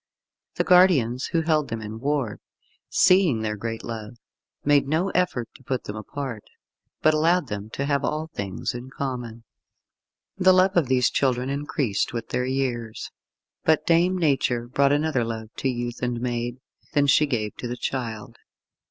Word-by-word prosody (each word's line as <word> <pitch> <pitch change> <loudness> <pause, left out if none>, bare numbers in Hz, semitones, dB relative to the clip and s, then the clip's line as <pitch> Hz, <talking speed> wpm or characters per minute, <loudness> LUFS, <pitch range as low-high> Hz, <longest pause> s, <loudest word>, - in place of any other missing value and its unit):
The - - +1
guardians 150 -10 +4
who 165 - +1
held 155 -2 +2
them 115 - -3
in 110 +1 -7
ward, 140 -5 -1 0.5
seeing 180 - +4
their 105 -1 -1
great 115 +2 -5
love, 115 +1 -7 0.5
made 145 -1 +4
no 160 +6 +1
effort 155 -10 0
to - - -17
put 130 0 -2
them 105 - -6
apart, 120 +1 -5 0.6
but 155 - +5
allowed 160 -1 +2
them 105 +1 -5
to 140 - -2
have 140 -1 0
all 155 +1 -1
things 100 - -4
in 120 +2 -7
common. 125 -4 -5 1.0
The 185 0 +6
love 185 +1 +4
of 170 -6 +3
these 125 -1 +3
children 130 -1 +1
increased 140 -7 -1
with 115 -1 -4
their 125 0 -1
years, 125 -4 -2 0.5
but 155 -1 +3
Dame 175 +2 +3
Nature 135 -7 +1
brought 140 +3 +2
another 145 -3 +1
love 110 -1 -5
to 135 - 0
youth 120 -1 -4
and 120 -1 -1
maid 120 0 -2 0.4
than 145 -1 +3
she 150 +2 +4
gave 110 -6 -2
to 125 - -5
the 120 +1 -4
child. 115 -5 -4
130 Hz, 165 wpm, -25 LUFS, 115-150 Hz, 1.0 s, The